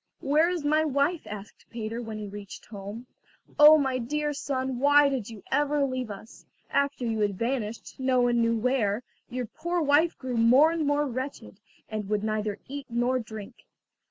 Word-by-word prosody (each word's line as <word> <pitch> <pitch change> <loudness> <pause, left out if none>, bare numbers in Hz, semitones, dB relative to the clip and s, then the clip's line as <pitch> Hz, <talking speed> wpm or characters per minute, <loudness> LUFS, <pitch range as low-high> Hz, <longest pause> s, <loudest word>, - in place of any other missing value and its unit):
"Where 305 +5 +3
is 350 -5 -3
my 305 +2 +3
wife?" 295 +3 0
asked 205 0 -9
Peter, 230 0 -4
when 220 -2 -6
he 210 - -5
reached 200 0 -9
home. 205 +3 -8 0.5
"Oh, 300 +1 +10
my 265 -3 0
dear 295 +5 -2
son, 260 -3 -3
why 285 +1 +6
did 255 -6 -3
you 220 -4 -10
ever 290 0 +2
leave 255 -3 -3
us? 205 +3 -10 0.3
After 280 -2 0
you 225 -2 -1
had 205 -2 0
vanished, 230 -1 -3
no 260 -1 +2
one 240 -1 +2
knew 230 0 +2
where, 230 -2 0 0.3
your 250 0 -3
poor 345 +10 -3
wife 310 +2 +3
grew 255 -2 -4
more 255 +8 +6
and 325 -3 -1
more 290 +1 +2
wretched, 260 +1 -6 0.3
and 215 -2 -5
would 210 -1 0
neither 215 -1 -1
eat 280 0 -7
nor 240 +2 +1
drink. 220 0 -10
255 Hz, 180 wpm, -27 LUFS, 220-285 Hz, 0.5 s, Oh